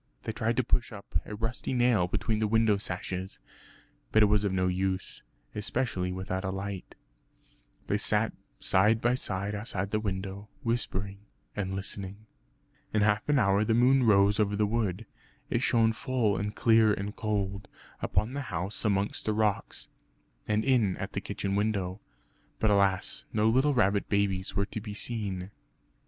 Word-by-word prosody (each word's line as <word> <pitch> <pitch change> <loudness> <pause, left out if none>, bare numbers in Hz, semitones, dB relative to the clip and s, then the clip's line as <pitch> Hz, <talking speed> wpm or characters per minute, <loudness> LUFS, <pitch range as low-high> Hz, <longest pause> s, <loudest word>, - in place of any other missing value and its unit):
They - - -3
tried 110 +2 -1
to 130 - +3
push 120 +1 0
up 100 -6 -4
a 105 - -6
rusty 115 +4 -3
nail 120 -7 +3
between 110 +4 -1
the 110 - +1
window 110 -1 +3
sashes; 95 0 -4 0.7
but 110 - +5
it - - +7
was 105 0 +3
of 100 - +1
no 90 -1 +1
use, 95 +1 -1 0.3
especially 105 -4 -1
without 95 +1 -3
a 95 - -1
light. 95 0 -5 0.9
They - - 0
sat - - +1 0.3
side 105 +4 +3
by 120 +2 +2
side 100 -4 -2
outside 100 -2 -3
the 110 - +1
window, 100 0 -4
whispering 100 -4 -2 0.4
and 95 -2 -2
listening. 95 +1 -4 0.7
In 105 -1 +2
half 105 +4 +1
an 145 - +4
hour 100 -3 +3
the 110 +1 +2
moon 130 +3 +5
rose 100 -3 +4
over 105 -1 +2
the 105 +1 +2
wood. 105 -1 -1 0.5
It - - +1
shone 115 -1 +3
full 120 -4 0
and 105 +1 -3
clear 110 -2 +5
and 105 +1 -3
cold, 100 -2 -2 0.3
upon 110 +4 0
the 140 - -2
house 90 +6 -3
amongst 100 -1 0
the 110 - +2
rocks, 105 -2 -1 0.6
and 105 +1 +1
in 120 -8 +3
at 95 - -5
the 100 - -2
kitchen 100 0 -3
window. 100 -2 -1 0.6
But 110 - +2
alas, 100 -2 +1
no 110 0 +3
little 130 +5 +3
rabbit 100 -3 +2
babies 100 -2 0
were 100 - +1
to 110 +1 -6
be 105 -1 -7
seen! 100 -5 -2
105 Hz, 165 wpm, -29 LUFS, 95-110 Hz, 0.9 s, it